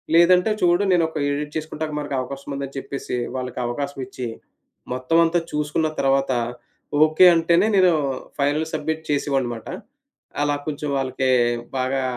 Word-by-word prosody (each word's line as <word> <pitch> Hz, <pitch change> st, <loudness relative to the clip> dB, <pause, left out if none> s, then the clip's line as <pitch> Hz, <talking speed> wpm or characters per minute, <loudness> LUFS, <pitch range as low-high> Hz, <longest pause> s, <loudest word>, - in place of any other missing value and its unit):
లేదంటే 180 Hz, +4 st, +5 dB
చూడు 175 Hz, +2 st, +3 dB
నేనొక 165 Hz, -3 st, +2 dB
ఎడిట్ 150 Hz, +1 st, -3 dB
చేసుకుంటానికి 155 Hz, -1 st, -4 dB
మనకు 145 Hz, -2 st, -4 dB
అవకాశముందని 140 Hz, +1 st, -6 dB
చెప్పేసీ, 135 Hz, -2 st, -4 dB, 0.2 s
వాళ్ళకవకాశమిచ్చి, 130 Hz, 0 st, -4 dB, 0.7 s
మొత్తవంతా 165 Hz, +6 st, +2 dB
చూసుకున్న 150 Hz, +1 st, 0 dB
తర్వాతా, 135 Hz, -2 st, +2 dB, 0.7 s
ఓకే 155 Hz, +4 st, +5 dB
అంటేనే 170 Hz, +5 st, +3 dB
నేనూ 185 Hz, -3 st, +5 dB, 0.5 s
ఫైనల్ 145 Hz, +3 st, +1 dB
సబ్మిట్ 160 Hz, +1 st, -2 dB
చేసేవాడినిమాట. 135 Hz, -5 st, -1 dB, 0.8 s
అలా 145 Hz, 0 st, +1 dB
కొంచెం 150 Hz, 0 st, -3 dB
వాళ్ళకీ 130 Hz, 0 st, -1 dB, 0.5 s
బాగా 130 Hz, +1 st, 0 dB
145 Hz, 110 wpm, -22 LUFS, 135-160 Hz, 0.8 s, లేదంటే